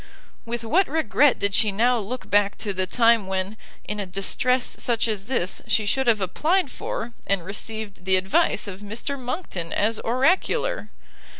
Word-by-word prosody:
With 235 0 -4
what 335 - +2
regret 295 -3 +3
did 200 0 0
she 210 0 +3
now 240 +4 +2
look 230 +5 -6
back 205 0 +2
to 205 -2 -3
the 185 0 -1
time 230 -1 +3
when, 190 +2 -2 0.3
in 210 0 -5
a 200 - -3
distress 245 +7 +1
such 235 -1 0
as 210 -3 -3
this, 210 -7 -2
she 215 - +2
should 265 +5 +1
have 220 -3 +3
applied 305 - +1
for, 235 +1 -5
and 195 -4 0
received 205 0 -5
the 190 0 +4
advice 190 +2 +2
of 190 -1 -7
Mr 220 +7 -3
Monckton 245 - -4
as 220 +2 0
oracular! 295 - +1
220 Hz, 170 wpm, -24 LUFS, 195-250 Hz, 0.3 s, the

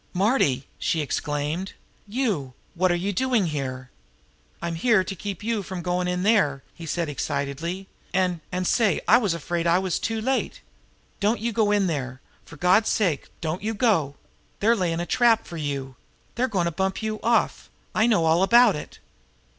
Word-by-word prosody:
"Marty!" 180 - +2
she 165 - 0
exclaimed. 150 +4 -2 0.3
"You! 200 - -2 0.2
What 185 0 +2
are - - +2
you 195 +4 -2
doing 245 -1 +1
here?" 130 -5 -4 0.7
"I'm 170 0 -3
here 190 +3 +3
to 195 - -5
keep 200 0 -6
you 225 -1 0
from 185 -2 -6
goin' 180 +1 0
in 180 0 -1
there!" 150 -11 +2
he 165 - -10
answered 170 +1 -1
excitedly. 150 +6 -3 0.2
"And 180 -2 +1
and, 180 0 -2
say, 215 -2 +2
I - - +7
was 200 -8 0
afraid 170 +1 -2
I 170 +1 +4
was 185 -2 -1
too 225 0 -2
late. 260 +4 -1 0.6
Don't 210 +2 +1
you 235 +2 -1
go 215 -1 +2
in 205 -1 +3
there! 130 -6 -3 0.3
For 165 - -13
God's 185 +7 +4
sake, 175 -10 0
don't 160 +2 -2
you 220 +2 -2
go! 190 - +2 0.4
They're 225 +3 +4
layin' 170 -5 -1
a 175 - -2
trap 235 +1 +3
for 170 - -8
you! 140 -3 -4 0.4
They're 250 +3 0
goin' 190 -7 0
to 170 - 0
bump 190 +5 -2
you 215 -1 -2
off! 235 +1 +1 0.2
I 220 - +3
know 210 -8 +3
all 160 +2 +3
about 235 +2 +6
it!" 150 - -8
180 Hz, 180 wpm, -25 LUFS, 160-215 Hz, 0.7 s, I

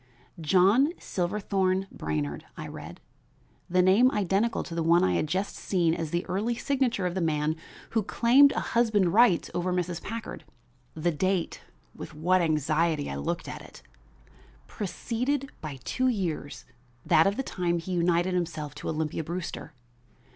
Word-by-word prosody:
"John 195 - +4
Silverthorn 190 0 -1
Brainard," 75 -1 -3
I - - -6
read, - - -9 0.7
the 180 +1 +3
name 200 +8 +5
identical 210 -1 0
with - - -10
the 165 0 -2
one 170 +2 +4
I 90 - +2
had 85 - 0
just 190 +6 -2
seen 170 -4 +1
as 165 -2 -3
the 170 +3 -2
early 210 +6 -1
signature 255 -7 0
of 180 - -1
the 190 - -2
man 155 -1 0 0.4
who 225 - +2
claimed 250 +7 +5
a - - -1
husband's 220 -6 +3
rights 200 -2 +4
over 175 +1 -1
Mrs. 180 -1 -2
Packard. 230 +1 -6 0.5
The 165 +2 0
date 185 +2 -1 0.3
with - - -9
what 180 +4 +2
anxiety 155 -1 +1
I - - -4
looked 70 +1 -3
at - - -7
it! - - -14 0.8
preceded 250 +7 -3
by 150 -4 -6
two 255 0 0
years 175 - -2 0.4
that 160 +4 +5
of 200 - 0
the 270 - -1
time 175 -7 -1
he 170 +2 -6
united 175 +1 +1
himself 160 -5 -3
to - - -4
Olympia 160 0 -2
Brewster. 170 -1 -6
180 Hz, 155 wpm, -27 LUFS, 160-205 Hz, 0.8 s, name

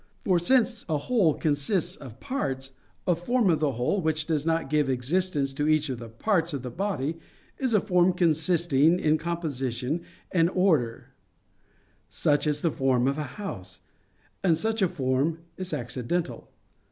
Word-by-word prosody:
For 185 -3 +3
since 235 +4 +2
a 155 - +2
whole 170 - +2
consists 150 +4 0
of 130 -3 -12
parts, 135 - -3 0.3
a 180 - +3
form 195 +4 +1
of 160 - +1
the 150 -3 +1
whole 125 - 0
which 155 -1 0
does 155 -2 -1
not 165 -1 +1
give 150 -1 +1
existence 140 +2 0
to 145 +2 -1
each 155 -1 +2
of 130 -3 -3
the 115 -1 -8
parts 165 - 0
of 135 -3 -4
the 125 - -5
body, 165 - -2 0.4
is 255 -4 +1
a - - +6
form 180 -2 +3
consisting 165 -1 +3
in 155 -1 +2
composition 145 -4 -2 0.3
and 170 -2 +3
order, 145 -11 +1 1.0
such 145 +1 +1
as 150 -1 0
the 165 - +1
form 130 -2 +1
of 140 +2 0
a - - -1
house; 195 - -7 0.6
and 170 -4 +3
such 220 +4 0
a 190 - +5
form 145 -1 0 0.2
is 185 -1 -5
accidental. 125 +3 -3
155 Hz, 165 wpm, -27 LUFS, 135-180 Hz, 1.0 s, a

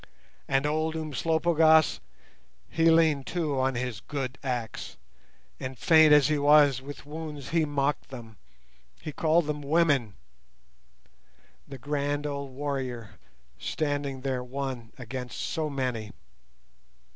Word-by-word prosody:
And 135 +1 +1
old 155 +2 0
Umslopogaas, 160 - +3 0.7
he 165 0 +2
leaned 160 -4 +3
too 155 -6 -1
on 130 0 +1
his 125 -4 -3
good 135 +4 -5
axe, 120 -5 -4 0.6
and, 130 0 -6
faint 160 +1 +6
as 150 -2 +6
he 150 -1 +1
was 145 -2 +5
with 145 +2 -10
wounds, 150 -4 -7
he 165 0 +2
mocked 145 -1 -1
them, 115 -5 -10 0.6
he 155 - -6
called 160 +2 +2
them 150 0 -3
"women"—the 140 - +1 1.6
grand 145 +2 -2
old 140 -2 -4
warrior, 130 -5 -5 0.4
standing 145 - -2
there 130 -2 -2
one 130 -3 -5
against 125 0 -6
so 155 -1 -2
many! 125 -6 -3
140 Hz, 115 wpm, -27 LUFS, 130-155 Hz, 1.6 s, faint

